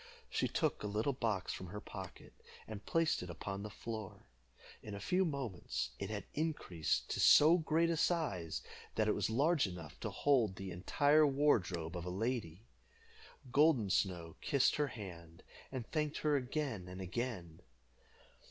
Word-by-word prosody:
She - - +1
took - - 0
a 105 - -2
little 110 +7 0
box 110 -7 -1
from 95 - -6
her 105 +4 -6
pocket, 95 -3 -9 0.3
and 105 -1 -7
placed 165 -1 +2
it 90 - -6
upon 95 +3 -5
the 105 - -5
floor. 110 -1 -7 0.6
In 105 - -7
a - - -6
few 185 - +2
moments 135 - -3
it 100 - -3
had 105 -2 -3
increased 145 - -1
to - - -1
so 160 +4 +7
great 165 +1 +2
a 165 - 0
size 135 - 0 0.3
that - - +2
it - - +3
was - - 0
large 145 - +3
enough 85 -5 -8
to - - -3
hold 120 -9 +2
the 95 -1 -6
entire 145 - +4
wardrobe 95 - +1
of 85 -1 -4
a - - -3
lady. 105 -2 -2 0.9
Golden 140 -8 +4
Snow 85 -4 0
kissed 140 -3 +3
her 150 -1 +2
hand, 85 -8 -9 0.3
and 130 -4 -4
thanked 150 -1 0
her 150 -1 +4
again 130 - -2
and 90 +1 -8
again. 95 -4 -4
110 Hz, 160 wpm, -36 LUFS, 90-145 Hz, 0.9 s, so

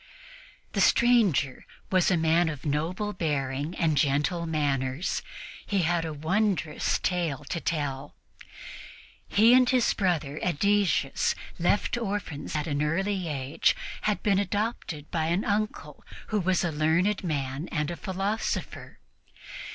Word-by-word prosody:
The - - +1
stranger 220 - +3 0.3
was 185 -2 +3
a 180 - +3
man 165 +1 +3
of 150 -2 -7
noble 170 +8 -1
bearing 145 -2 -2
and 160 -3 +1
gentle 150 +5 +1
manners. 140 -1 -1 0.4
He 195 -3 0
had 165 0 +1
a 160 - -3
wondrous 170 +1 0
tale 170 -6 -1
to 170 - -2
tell. 145 -4 -3 1.1
He 225 +4 +5
and 255 -1 +5
his 255 -2 +3
brother 155 -7 -1
Ædesius, 185 -4 +1 0.2
left 205 +7 +1
orphans 200 -10 -4
at 150 -1 -1
an 145 -2 -1
early 185 +4 0
age, 140 -1 +1 0.3
had 210 -1 -1
been 200 -2 +3
adopted 200 -6 -3
by 160 -2 0
an 175 +5 0
uncle 210 +1 -2 0.3
who 215 - +1
was 185 -1 +1
a 175 - 0
learned 165 +7 +1
man 140 -1 -3
and 150 +1 -1
a - - -4
philosopher. 195 +3 -3
170 Hz, 130 wpm, -27 LUFS, 150-200 Hz, 1.1 s, He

